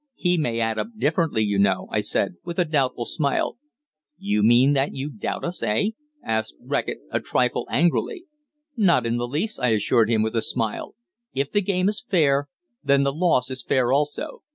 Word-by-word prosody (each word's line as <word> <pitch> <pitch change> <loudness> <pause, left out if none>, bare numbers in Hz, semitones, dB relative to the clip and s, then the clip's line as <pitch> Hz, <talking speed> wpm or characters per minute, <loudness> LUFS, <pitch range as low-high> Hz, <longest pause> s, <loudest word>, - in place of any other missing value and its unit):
He 180 -1 +1
may 120 -9 -1
add 115 -1 0
up - - -2
differently, 155 - +1
you 100 -2 0
know," 95 -2 +2
I - - +1
said, 85 - -1
with 170 -1 -6
a 180 - +3
doubtful 135 -6 0
smile. 145 - -1 0.6
"You 105 +1 0
mean 120 +6 +5
that 135 0 0
you 140 +3 -4
doubt 110 - -4
us, 175 +1 -4
eh?" 115 - +1 0.3
asked 110 - -2
Reckitt - - -3
a - - +1
trifle - - 0
angrily. 330 - +1 0.5
"Not 175 - +3
in 115 +1 0
the 120 0 -2
least," 160 - -2
I 125 - +1
assured 110 +1 +2
him, 110 -2 +2
with 110 +1 -2
a 115 - +2
smile. 110 -1 -3 0.4
"If 140 +1 -1
the 205 - +2
game 185 -1 0
is 210 +1 -1
fair, 145 - +2 0.3
then 140 0 +3
the 140 0 0
loss 150 -6 +1
is 130 0 -3
fair 125 0 +1
also. 145 +1 -1
135 Hz, 190 wpm, -24 LUFS, 115-165 Hz, 0.6 s, mean